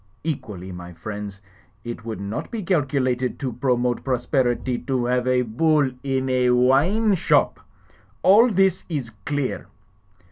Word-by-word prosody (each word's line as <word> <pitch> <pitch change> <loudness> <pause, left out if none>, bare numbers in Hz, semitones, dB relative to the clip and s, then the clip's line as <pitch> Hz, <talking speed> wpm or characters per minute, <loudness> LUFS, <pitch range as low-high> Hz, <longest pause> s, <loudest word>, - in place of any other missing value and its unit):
Equally, 105 - -5
my 90 0 -9
friends, 100 +2 -7 0.4
it 120 -2 -6
would 110 -3 -5
not 100 +2 -4
be 225 -3 -4
calculated 135 -7 0
to 130 -4 -3
pro 125 -1 +1
mote 120 0 -1
prosperity 125 -1 0
to 130 -3 -1
have 125 0 0
a 125 0 +3
Bull 140 +4 +2
in 135 -1 -1
a 125 -1 +2
wine 145 - +3
shop. 185 - +2 0.6
All 220 +6 +6
this 190 -3 +2
is 135 -8 -3 0.2
clear." 145 -2 -2
130 Hz, 140 wpm, -23 LUFS, 120-145 Hz, 0.6 s, All